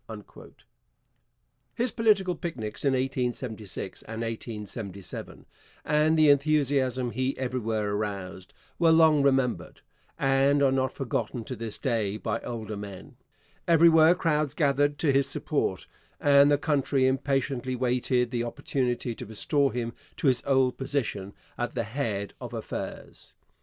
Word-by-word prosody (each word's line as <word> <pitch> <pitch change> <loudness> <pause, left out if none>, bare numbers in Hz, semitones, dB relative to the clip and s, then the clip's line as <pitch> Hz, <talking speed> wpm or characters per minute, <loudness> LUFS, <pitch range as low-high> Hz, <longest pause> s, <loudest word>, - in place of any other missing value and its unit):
His 240 0 0
political 205 -5 +2
picnics 125 - -6
in 140 -2 +3
1876 125 -5 -3
and 115 0 -7
1877, 105 -4 -7 0.4
and 155 +1 +3
the 155 -1 +6
enthusiasm 140 -4 +1
he 130 +3 -2
everywhere 115 -5 -2
aroused, 100 -3 -4 0.3
were 170 -1 +5
long 160 -2 +5
remembered, 135 -3 0 0.4
and 135 +1 +3
are 135 - +4
not 130 0 +1
forgotten 125 -2 -3
to 130 - -6
this 115 -2 -6
day 110 -6 -1
by 110 +1 -2
older 110 -3 -5
men. 100 -2 -9 0.5
Everywhere 165 0 +6
crowds 150 -4 0
gathered 145 -1 +2
to 145 -2 +2
his 135 0 +2
support, - - -1 0.3
and 140 0 +6
the 145 - +4
country 140 -3 +1
impatiently 130 -1 0
waited 125 -1 0
the 120 -2 -1
opportunity 125 0 -2
to - - -8
restore 135 +6 0
him 120 -1 -3 0.2
to - - -4
his 130 -3 +3
old 130 -2 +2
position 125 -8 -2 0.3
at - - -3
the - - 0
head 105 -4 -3
of - - -6
affairs. - - -7
130 Hz, 130 wpm, -27 LUFS, 115-145 Hz, 0.5 s, the